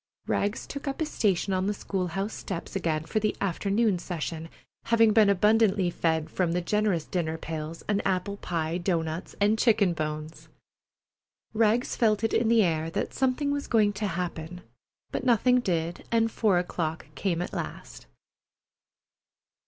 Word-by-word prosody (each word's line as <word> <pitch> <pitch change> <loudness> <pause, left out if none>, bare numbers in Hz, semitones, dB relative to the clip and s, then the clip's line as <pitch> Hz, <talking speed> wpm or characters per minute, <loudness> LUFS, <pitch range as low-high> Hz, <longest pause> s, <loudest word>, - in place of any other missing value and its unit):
Rags 205 +2 -1
took 280 +1 -7
up 275 - -3
his 315 -2 -2
station 195 -2 +1
on 185 +1 0
the 205 - 0
school 190 -2 -2
house 195 +5 -3
steps 190 -2 -6
again 160 -5 0
for 170 +7 -1
the 215 0 0
afternoon 200 +2 +1
session, 165 -2 -5 0.4
having 230 -1 +4
been 215 -2 +6
abundantly 200 -1 +3
fed 160 -2 0
from 175 -3 0
the 180 - +1
generous 200 -3 0
dinner 160 -3 -2
pails, 160 0 -6
on 205 -1 +1
apple 195 +1 -1
pie, 165 -2 -2
doughnuts, 165 -2 -2
and 210 +2 +3
chicken 205 -6 +4
bones. 155 0 -5 1.1
Rags 225 +2 +2
felt 215 -3 +2
it 225 - +1
in 230 - +2
the 230 -1 +5
air 160 -2 0
that - - -3
something 265 +2 +1
was 285 0 -2
going 210 -3 +3
to 205 +1 -2
happen, 175 -1 -4 0.5
but - - -3
nothing 250 0 +4
did, 170 -6 -2
and 225 -1 +2
four 210 -6 +2
o'clock 165 -2 -2
came 180 -4 -1
at 180 - -4
last. - - -6
195 Hz, 160 wpm, -27 LUFS, 165-220 Hz, 1.1 s, been